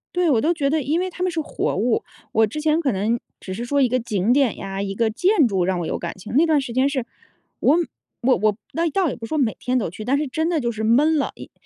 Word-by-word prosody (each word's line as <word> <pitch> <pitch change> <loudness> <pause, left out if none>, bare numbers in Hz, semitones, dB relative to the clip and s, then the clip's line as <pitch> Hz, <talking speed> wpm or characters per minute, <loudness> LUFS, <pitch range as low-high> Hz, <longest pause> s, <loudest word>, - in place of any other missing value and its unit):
对， 355 -2 +2
我 240 - +4
都 315 +9 +2
觉 290 -5 0
得 310 +1 +1
因 290 +4 0
为 370 - -2
它 360 0 -5
们 365 - +2
是 335 -2 -2
活 310 - -2
物。 225 +4 +1 0.3
我 220 0 +3
之 300 +9 -5
前 310 +1 +2
可 280 -7 0
能 215 +5 0 0.2
只 185 - -6
是 230 +5 -4
说 280 +3 +1
一 255 - +3
个 255 +2 +1
景 215 -2 0
点 265 -3 +3
呀、 195 0 -5
一 195 0 -3
个 225 +1 +1
建 360 - +3
筑 190 -6 +1
让 185 0 0
我 - - -3
有 - - -2
感 170 - -4
情， 190 - -9
那 320 - +6
段 310 -3 +3
时 265 -3 -6
间 260 +3 +2
是 265 -4 -2 0.5
我 295 - +4 0.5
我 255 +1 +3
我 210 -1 +1
那 335 +1 0
倒 360 +2 +1
也 - - -4
不 230 - -7
是 - - -8
说 315 - -2
每 250 -7 +1
天 255 +1 0
都 215 -8 -1
去， 210 +5 -8
但 270 +4 +2
是 300 - 0
真 315 +4 -1
的 335 -3 0
就 235 -1 0
是 220 -1 -3
闷 295 +8 +4
了 285 - -1
一 - - -11
255 Hz, 315 characters per minute, -22 LUFS, 220-310 Hz, 0.5 s, 那